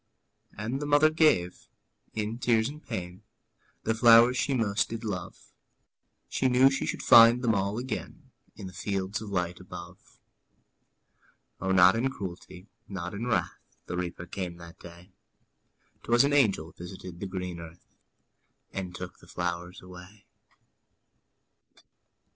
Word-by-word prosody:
'' - - -32
And 115 +7 -3
the 145 - -3
mother 145 +2 +5
gave, 155 - +2 0.5
in 110 +2 -3
tears 115 -3 +2
and 150 +1 -10
pain, 90 -5 -6 0.6
The 110 - +1
flowers 115 +2 +6
she 135 +1 0
most 105 -4 0
did 115 0 -6
love; 100 -5 -6 0.7
She 130 - 0
knew 130 +2 +5
she 135 - -2
should - - -4
find 115 +2 +8
them 115 -2 +3
all 100 +1 -1
again 125 -2 -6 0.2
In 100 - -9
the 95 - -9
fields 100 +2 -3
of 110 - -7
light 90 -2 -2
above. 90 0 -12 1.4
O, 95 - -1
not 90 +2 +6
in 125 +4 +1
cruelty, 90 -4 -8 0.2
not 90 -2 -6
in 110 +4 -4
wrath, 120 - -1 0.3
The - - -5
Reaper 90 -1 -4
came 90 -1 -5
that 85 0 -13
day; 85 +2 -14 0.9
'Twas 120 +2 +3
an 140 +1 +1
angel 100 - +2
visited 90 0 -10
the 100 - -4
green 90 -2 -5
earth, 85 0 -12 0.9
And 90 -2 -5
took 90 -1 -8
the - - -18
flowers 90 +1 -4
away. 90 +3 -13
100 Hz, 140 wpm, -28 LUFS, 90-115 Hz, 1.4 s, find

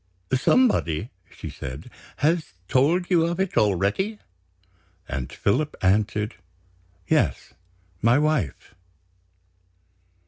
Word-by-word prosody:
"Somebody," 130 - +2 0.2
she - - -8
said, 70 - -8 0.3
"has 155 - +1
told 170 +8 +2
you 170 -2 +5
of 170 +1 -3
it 190 -1 -1
already?" 105 - +1 0.9
And 65 -2 -4
Philip 150 +9 0
answered: 105 +3 +1 0.7
"Yes; - - +1 0.5
my 115 +4 +4
wife." 150 - -1
125 Hz, 90 wpm, -24 LUFS, -, 0.9 s, you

